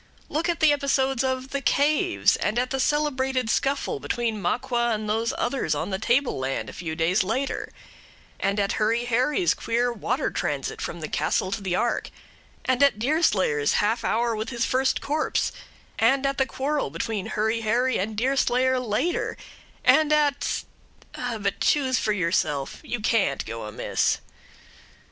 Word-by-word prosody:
Look 320 +4 -1
at 340 - -1
the 310 -2 +6
episodes 270 -2 +1
of 260 0 -2
"the 280 - -2
caves"; 280 - +2
and 210 +3 -1
at 250 +1 0
the 270 - -1
celebrated 265 -4 +1
scuffle 285 - 0
between 230 - -2
Maqua 240 +5 0
and 215 0 -5
those 225 +2 0
others 260 +2 0
on - - -3
the 190 - -2
table 250 - +1
land 130 +1 -3
a - - -15
few 160 -3 -5
days 170 +5 +2
later; 255 +8 -2 0.7
and 200 +1 0
at 200 -1 +1
Hurry 230 +2 +1
Harry's 255 +9 +2
queer 240 +1 0
water 245 +5 -1
transit - - -3
from - - -5
the - - -3
castle 185 - 0
to 215 - -2
the 185 -2 -1
ark; 240 +5 0 0.6
and 260 0 +1
at 280 -6 +5
Deerslayer's 210 - +2
half 225 +3 +1
hour 230 +1 +1
with 215 +1 -3
his 235 -2 -1
first 260 +1 +1
corpse; 300 +2 0 0.5
and 265 +5 +3
at 275 0 0
the 265 - +2
quarrel 285 - -1
between 190 +6 -3
Hurry 220 +2 0
Harry 240 +4 +1
and 210 +3 -2
Deerslayer 260 +1 +2
later; 250 - -1 0.5
and 295 +4 +5
at 295 -2 +1 0.5
but 215 -5 -3
choose 265 -4 +2
for 215 - 0
yourself; 165 -7 0
you 240 - -4
can't 205 - +1
go 115 -1 -6
amiss. 105 - 0
240 Hz, 160 wpm, -25 LUFS, 210-270 Hz, 0.7 s, the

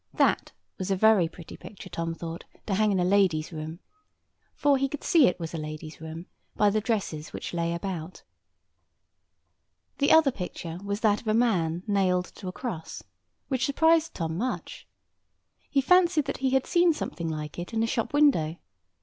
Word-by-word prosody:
That - - +2 0.3
was 185 0 -3
a 195 - +2
very 210 -3 +5
pretty 165 0 -11
picture, 195 -2 -11
Tom 165 -2 -3
thought, 165 0 -7 0.2
to 205 - -2
hang 215 +2 +3
in 190 - +1
a 180 - +2
lady's 185 -5 +2
room. 160 +3 -6 0.7
For 280 -2 +3
he 275 0 +1
could 295 - -6
see 325 -6 +5
that 180 - +2
it - - -31
was 165 -1 -5
a 165 - -3
lady's 155 +1 -7
room 160 +2 -7 0.3
by 205 -1 +4
the 215 +1 +1
dresses 200 -9 -2
which - - -6
lay 170 -1 -1
about. 175 -1 -5 1.8
The 285 +1 +3
other 320 -4 +6
picture 180 -5 -6
was 200 +1 -3
that 210 -2 +3
of 235 - -14
a 215 - +2
man 180 -8 +1
nailed 185 -3 +2 0.2
to 190 - -6
a - - -2
cross, 185 -7 -6 0.4
which 260 -3 0
surprised 320 +3 +3
Tom 165 0 -3
much. 250 +3 -4 0.8
He 275 - +2
fancied 345 0 +4
that - - -3
he 265 0 0
had 265 0 +2
seen 345 -1 +4
something 170 - -4
like 155 0 -5
it 175 - -6
in 225 -1 0
a - - +3
shop 230 0 -1
window. 275 - +3
195 Hz, 185 wpm, -27 LUFS, 165-255 Hz, 1.8 s, other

